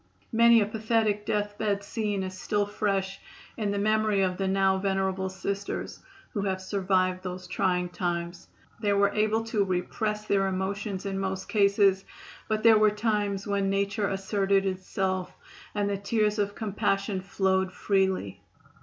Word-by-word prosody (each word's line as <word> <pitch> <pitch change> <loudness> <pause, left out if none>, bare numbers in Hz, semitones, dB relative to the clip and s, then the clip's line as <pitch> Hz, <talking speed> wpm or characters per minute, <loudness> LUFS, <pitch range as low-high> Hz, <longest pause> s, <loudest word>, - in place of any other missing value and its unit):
Many 230 0 +6
a - - +2
pathetic 215 -1 0
death 205 0 -1
bed 205 -2 0
scene 205 -2 -2
is 185 0 -5
still 205 +2 0
fresh 195 -2 -1 0.4
in 215 -3 -2
the 200 - -1
memory 215 -1 +2
of 185 -1 0
the 195 - -1
now 190 0 +2
venerable 190 -1 0
Sisters 200 +1 -4 0.3
who 205 - -1
have 190 -1 -1
survived 185 -1 0
those 185 0 -6
trying 180 0 0
times. 175 -1 -3 0.3
They 205 -2 +1
were 200 0 +3
able 215 +1 +1
to 225 -2 0
repress 210 +3 -2
their 195 -2 +2
emotions 190 +1 -3
in 195 -1 -2
most 190 -1 -3
cases, 200 -2 +3 0.4
but 215 0 -1
there 225 -2 +7
were 215 0 +6
times 210 -2 -1
when 200 -1 0
nature 200 +1 0
asserted 195 0 +1
itself, 185 0 -2 0.4
and 205 -1 +1
the 200 -1 -1
tears 210 +1 0
of 205 0 -1
compassion 195 -2 -1
flowed 190 0 0
freely. 190 - 0
200 Hz, 155 wpm, -27 LUFS, 190-210 Hz, 0.4 s, there